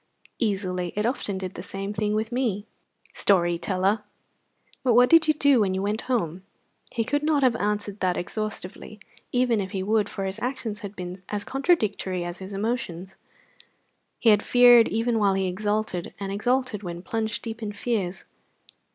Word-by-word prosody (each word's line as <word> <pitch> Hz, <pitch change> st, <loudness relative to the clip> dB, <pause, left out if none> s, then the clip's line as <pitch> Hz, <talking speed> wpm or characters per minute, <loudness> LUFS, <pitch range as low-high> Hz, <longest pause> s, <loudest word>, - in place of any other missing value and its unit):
"Easily. 185 Hz, -5 st, -1 dB
It 210 Hz, +1 st, 0 dB
often 230 Hz, -5 st, -1 dB
did 190 Hz, 0 st, -5 dB
the -, -, -7 dB
same 195 Hz, +2 st, -5 dB
thing 210 Hz, 0 st, 0 dB
with 220 Hz, +2 st, -1 dB
me." 230 Hz, -5 st, -1 dB, 0.5 s
"Story 175 Hz, -3 st, +2 dB
teller! 195 Hz, +3 st, 0 dB, 0.8 s
But 245 Hz, -3 st, +3 dB
what 245 Hz, +1 st, +6 dB
did 330 Hz, -1 st, +7 dB
you 310 Hz, -, +5 dB
do 285 Hz, -3 st, +4 dB
when 190 Hz, -3 st, +1 dB
you 190 Hz, -, -1 dB
went 210 Hz, +2 st, -1 dB
home?" 185 Hz, -8 st, 0 dB, 0.5 s
He 230 Hz, -, 0 dB
could 290 Hz, +6 st, 0 dB
not 300 Hz, -2 st, +2 dB
have 250 Hz, -3 st, +4 dB
answered 205 Hz, -1 st, -2 dB
that 180 Hz, -1 st, +1 dB
exhaustively, 215 Hz, +1 st, -5 dB, 0.3 s
even 245 Hz, -4 st, +2 dB
if 190 Hz, -, -4 dB
he 190 Hz, 0 st, -3 dB
would, 215 Hz, +1 st, +1 dB
for 195 Hz, -, -4 dB
his 190 Hz, 0 st, -4 dB
actions 240 Hz, -4 st, -3 dB
had 200 Hz, 0 st, -8 dB
been 180 Hz, 0 st, -7 dB
as 205 Hz, -1 st, -2 dB
contradictory 215 Hz, -, 0 dB
as 175 Hz, 0 st, -5 dB
his 190 Hz, +1 st, -8 dB
emotions. 195 Hz, -4 st, -3 dB, 1.0 s
He 230 Hz, -, +3 dB
had 210 Hz, -1 st, +4 dB
feared 245 Hz, -1 st, +7 dB
even 230 Hz, +1 st, 0 dB
while 200 Hz, -2 st, +3 dB
he 190 Hz, -1 st, 0 dB
exulted, 205 Hz, -1 st, -2 dB
and 195 Hz, -1 st, -4 dB
exulted 245 Hz, +1 st, 0 dB
when 175 Hz, -2 st, -6 dB
plunged 220 Hz, +2 st, -2 dB
deep 230 Hz, 0 st, -6 dB
in 210 Hz, -2 st, -3 dB
fears. 200 Hz, -4 st, -2 dB
210 Hz, 175 wpm, -25 LUFS, 190-235 Hz, 1.0 s, did